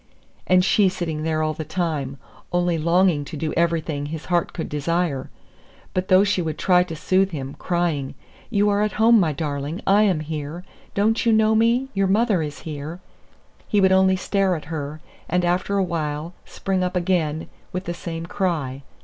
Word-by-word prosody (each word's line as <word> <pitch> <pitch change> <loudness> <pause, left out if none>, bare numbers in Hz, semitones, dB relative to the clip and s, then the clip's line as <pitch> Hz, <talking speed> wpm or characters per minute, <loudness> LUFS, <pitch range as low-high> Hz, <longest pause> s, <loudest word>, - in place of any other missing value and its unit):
And 185 0 +4
she 200 0 +4
sitting 165 -4 -3
there 155 0 0
all 155 0 0
the 155 - -5
time, 155 -5 -2 0.3
only 175 -1 +1
longing 170 -1 +3
to 155 - -7
do 155 +1 -2
everything 160 -3 0
his 160 +1 -6
heart 175 -1 0
could 165 - -4
desire! 150 -1 -1 0.6
But 185 0 -1
though 185 +1 +6
she 205 -2 +1
would 160 -2 -3
try 180 -1 +4
to 180 -2 -3
soothe 190 +4 +2
him, 140 -5 -5
crying, 170 -6 -1 0.3
"You 205 -3 +2
are 205 0 +2
at 210 -2 0
home, 225 +1 +5
my 170 -5 +2
darling. 145 +2 -3
I 200 +2 +5
am 190 -7 +2
here. 155 +2 -5 0.3
Don't 220 +3 +2
you 230 - +3
know 220 0 +4
me? 235 +4 +2
Your 195 -1 +1
mother 205 -2 +2
is 150 -2 -5
here!" 155 +2 -6 0.7
he 210 - +2
would 190 -1 +4
only 190 0 +5
stare 190 0 +1
at 155 - -7
her, 150 0 -5 0.3
and 180 +1 +1
after 180 +3 0
a 195 - +3
while 160 -1 -3
spring 190 -1 -2
up 180 +1 -2
again 170 -4 0 0.2
with 185 +1 -3
the 175 - -3
same 165 -1 -6
cry. 160 -8 -2
175 Hz, 185 wpm, -23 LUFS, 155-190 Hz, 0.7 s, though